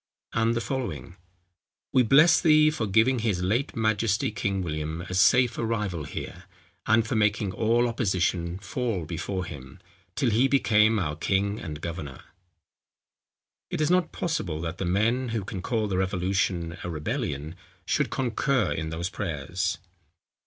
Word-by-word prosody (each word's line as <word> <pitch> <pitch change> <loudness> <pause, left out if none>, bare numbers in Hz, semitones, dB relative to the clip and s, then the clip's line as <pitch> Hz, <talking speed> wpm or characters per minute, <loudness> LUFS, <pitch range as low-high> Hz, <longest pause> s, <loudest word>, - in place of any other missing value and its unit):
And 115 +1 +2
the 115 - 0
following, 95 - -4 0.8
"We 130 - +6
bless 150 +8 +6
thee 155 -2 +5
for 120 -8 -2
giving 115 +6 +3
his 105 -6 0
late 115 +11 0
majesty 110 +2 +1
King 100 -4 -2
William 80 0 -3
a 90 - -7
safe 120 +6 +4
arrival 105 -9 -2
here, 90 +5 -7 0.4
and 110 +1 +4
for 120 - -1
making 105 -2 +1
all 115 +4 +2
opposition 90 -6 0
fall 100 -2 -3
before 90 +3 -3
him, 65 -7 -10 0.4
till 125 - +1
he 120 +5 +4
became 110 -5 +3
our 75 -7 -1
king 100 +5 0
and 75 -2 -7
governor." 80 -6 -6 1.5
It - - -3
is 155 +2 +2
not 180 -2 +2
possible 125 - -2
that 85 +2 -5
the 95 - -1
men, 115 +8 +1
who 110 -2 -2
can 95 -1 -6
call 110 +2 -1
the 95 -2 -1
revolution 90 -2 -1
a - - -4
rebellion, 75 -1 -3 0.3
should - - +1
concur 130 0 0
in 80 0 -3
those 85 +4 -3
prayers. 90 -1 -2
100 Hz, 150 wpm, -26 LUFS, 85-115 Hz, 1.5 s, We